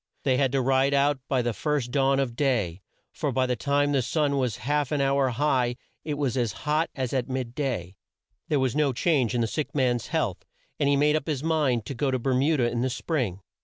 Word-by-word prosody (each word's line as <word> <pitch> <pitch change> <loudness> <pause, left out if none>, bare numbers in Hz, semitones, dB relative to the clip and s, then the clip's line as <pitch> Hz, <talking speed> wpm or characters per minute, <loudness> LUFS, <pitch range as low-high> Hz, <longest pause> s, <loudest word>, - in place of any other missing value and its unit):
They 130 -2 +2
had 135 -2 +2
to 135 -2 +2
ride 135 +2 +3
out 140 0 +2
by 130 -3 +1
the 120 -1 -1
first 145 -2 -1
dawn 135 0 +2
of 125 -4 -1
day, 110 - 0 0.3
for - - -2
by 130 -1 +1
the 125 -1 0
time 145 +2 +1
the 140 -2 +2
sun 140 +3 0
was 125 -6 -1
half 145 -1 0
an 150 - 0
hour 135 -1 +2
high 125 -1 +1 0.3
it 150 -1 -3
was 140 -3 -1
as 120 -4 0
hot 155 +2 +1
as 130 -2 -3
at 130 -1 -1
mid 130 -2 -3
day. 100 - -3 0.5
There 150 - +1
was 130 -1 0
no 150 -3 +2
change 130 -4 +1
in 120 - +1
the 115 - +1
sick 145 +8 -4
man's 125 -4 +1
health, - - -1 0.4
and 140 - +2
he 140 - +4
made 150 +2 +3
up 155 - -2
his 145 -3 -2
mind 145 -9 +1
to 140 - -5
go 135 +2 -1
to 130 - +1
Ber 130 +2 -1
mu 145 +5 +2
da 125 - +1
in 120 0 -1
the 130 - +1
spring. 125 - -2
135 Hz, 240 wpm, -26 LUFS, 125-145 Hz, 0.5 s, he